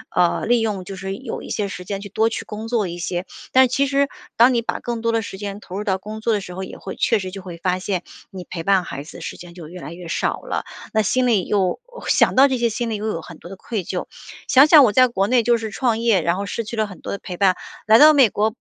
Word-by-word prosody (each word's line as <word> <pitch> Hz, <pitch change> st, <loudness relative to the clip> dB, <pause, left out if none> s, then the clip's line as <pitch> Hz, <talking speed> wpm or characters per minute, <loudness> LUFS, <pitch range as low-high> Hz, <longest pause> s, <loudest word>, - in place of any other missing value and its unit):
呃， 175 Hz, -1 st, +2 dB
利 240 Hz, 0 st, +3 dB
用 205 Hz, -4 st, -2 dB
就 195 Hz, -, -7 dB
是 190 Hz, +1 st, -5 dB
有 260 Hz, -2 st, -6 dB
一 -, -, -10 dB
些 205 Hz, -2 st, -1 dB
时 180 Hz, -1 st, -7 dB
间 195 Hz, +1 st, -4 dB
去 200 Hz, -, -7 dB
多 220 Hz, +3 st, +2 dB
去 225 Hz, -, -5 dB
工 215 Hz, +2 st, -7 dB
作 225 Hz, -5 st, +1 dB
一 175 Hz, -, -6 dB
些。 175 Hz, +1 st, -3 dB, 0.3 s
但 260 Hz, -, +7 dB
是 260 Hz, -, +4 dB
其 275 Hz, +3 st, +1 dB
实 280 Hz, +1 st, +2 dB, 0.3 s
当 245 Hz, +2 st, +6 dB
你 235 Hz, -, +2 dB
把 -, -, -3 dB
更 235 Hz, -2 st, -4 dB
多 230 Hz, 0 st, +1 dB
的 225 Hz, 0 st, +1 dB
时 195 Hz, -2 st, -7 dB
间 200 Hz, 0 st, -6 dB
投 185 Hz, -, -10 dB
入 210 Hz, -, -3 dB
到 190 Hz, -3 st, 0 dB
工 215 Hz, +3 st, -8 dB
作 225 Hz, 0 st, +1 dB
的 205 Hz, -, +1 dB
时 180 Hz, -2 st, -9 dB
候 190 Hz, -, -5 dB
也 -, -, -8 dB
会 190 Hz, -, -7 dB
确 225 Hz, -, +2 dB
实 185 Hz, -1 st, -5 dB
就 195 Hz, -, -8 dB
会 180 Hz, -2 st, -9 dB
发 180 Hz, +2 st, -1 dB
现， 185 Hz, -1 st, -2 dB, 0.3 s
你 190 Hz, -3 st, -8 dB
陪 165 Hz, -2 st, -6 dB
伴 195 Hz, 0 st, +3 dB
孩 140 Hz, -2 st, -6 dB
子 160 Hz, -, -11 dB
时 -, -, -6 dB
间 175 Hz, -1 st, -12 dB
就 170 Hz, -3 st, -10 dB
越 180 Hz, +2 st, -10 dB
来 -, -, -7 dB
越 175 Hz, 0 st, -10 dB
少 165 Hz, -, -1 dB
了。 -, -, -3 dB, 0.3 s
那 220 Hz, -, +3 dB
心 255 Hz, +5 st, +1 dB
里 210 Hz, -6 st, +2 dB
又 195 Hz, -, 0 dB, 0.3 s
想 -, -, +3 dB
到 270 Hz, +2 st, +7 dB
这 265 Hz, -2 st, -1 dB
些 235 Hz, -1 st, +1 dB
心 230 Hz, +1 st, -3 dB
里 220 Hz, -, -2 dB
又 210 Hz, +1 st, -4 dB
有 165 Hz, -6 st, -2 dB
很 165 Hz, -2 st, -11 dB
多 175 Hz, -, -12 dB
的 195 Hz, -, -8 dB
愧 205 Hz, -1 st, -4 dB
疚。 180 Hz, +1 st, -4 dB, 0.4 s
想 270 Hz, +2 st, +7 dB
想 305 Hz, -3 st, +8 dB
我 220 Hz, -, +2 dB
在 255 Hz, 0 st, +6 dB
国 195 Hz, -3 st, 0 dB
内 245 Hz, -2 st, +3 dB
就 240 Hz, 0 st, +3 dB
是 220 Hz, -2 st, -5 dB
创 235 Hz, -2 st, 0 dB
业， 225 Hz, -6 st, +3 dB
然 170 Hz, +3 st, 0 dB
后 200 Hz, -, -3 dB
失 230 Hz, -, -3 dB
去 225 Hz, +2 st, -6 dB
了 215 Hz, -, +2 dB
很 185 Hz, -5 st, -12 dB
多 -, -, -6 dB
的 200 Hz, -, -3 dB
陪 180 Hz, -, -7 dB
伴， 190 Hz, -2 st, +3 dB, 0.3 s
来 220 Hz, +1 st, +7 dB
到 310 Hz, +1 st, +9 dB
美 270 Hz, -6 st, +6 dB
国， 215 Hz, +2 st, 0 dB
205 Hz, 320 characters per minute, -21 LUFS, 185-230 Hz, 0.4 s, 到